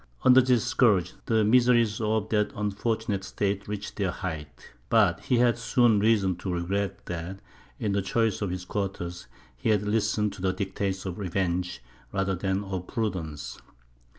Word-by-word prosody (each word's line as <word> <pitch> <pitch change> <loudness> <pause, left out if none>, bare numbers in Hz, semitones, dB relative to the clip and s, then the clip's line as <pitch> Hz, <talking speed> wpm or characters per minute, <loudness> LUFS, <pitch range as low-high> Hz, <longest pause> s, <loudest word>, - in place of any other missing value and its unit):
Under 130 0 +8
this 125 -3 +2
scourge, 100 -8 +3
the 110 -1 +3
miseries 120 -1 +4
of 110 0 0
that 105 -1 +1
unfortunate 105 0 -1
state 100 +1 -2
reached 105 0 -5
their 100 -3 0
height. 80 -5 -6 0.2
But 100 -7 +4
he 125 - +1
had 120 0 +3
soon 120 -3 +3
reason 100 -4 +2
to 95 +1 -4
regret 95 +3 -2
that, 90 +2 -5 0.4
in 105 - -1
the 100 0 +1
choice 110 +3 0
of 100 - -1
his 90 0 -4
quarters, 90 -3 -4 0.3
he - - -2
had 105 -2 +3
listened 105 -1 0
to 100 - -10
the 95 -1 +1
dictates 95 -1 -3
of 95 0 -5
revenge 90 -6 -2 0.3
rather 95 0 0
than 95 +2 -1
of 95 -2 -5
prudence. 85 -10 -4
100 Hz, 160 wpm, -27 LUFS, 95-110 Hz, 0.4 s, Under